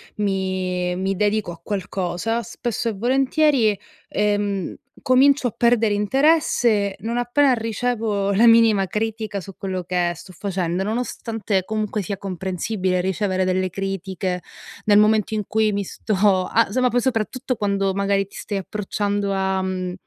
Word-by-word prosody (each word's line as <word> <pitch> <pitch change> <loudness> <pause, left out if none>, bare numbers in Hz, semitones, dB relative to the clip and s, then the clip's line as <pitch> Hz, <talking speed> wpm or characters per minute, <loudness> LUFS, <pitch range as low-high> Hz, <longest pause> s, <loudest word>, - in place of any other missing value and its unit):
mi 185 -3 -1
mi 190 +1 -1
dedico 210 -1 0
a 170 -1 -11
qualcosa, 195 +3 -2
spesso 235 +2 -3
e 220 - -3
volentieri, 255 0 +2 0.3
ehm, 205 -2 -1 0.3
comincio 270 +1 +4
a - - -3
perdere 230 -3 +2
interesse 230 -3 +2
non 230 +3 -2
appena 255 +3 +3
ricevo 225 -3 -1
la 225 +4 +5
minima 225 -4 +5
critica 215 0 -3
su 195 +1 -11
quello 185 -2 -4
che 175 -1 0
sto 185 - -12
facendo, 180 -2 -2
nonostante 220 -2 -2
comunque 215 0 -2
sia 195 +1 -4
comprensibile 185 0 -2
ricevere 190 0 0
delle 185 0 0
critiche, 190 -1 -3 0.4
nel 205 -1 +5
momento 215 0 +3
in 210 - -1
cui 220 +1 +1
mi 200 0 -1
sto 195 -1 +1
a 230 -3 +3
somma 255 +3 +2
poi 245 - +2
soprattutto 255 +1 -1
quando 200 -1 0
magari 200 0 +1
ti 195 - -18
stai 205 - -4
approcciando 205 0 -2
a 190 0 0
mhmm, 185 -1 -3
205 Hz, 145 wpm, -22 LUFS, 190-225 Hz, 0.4 s, la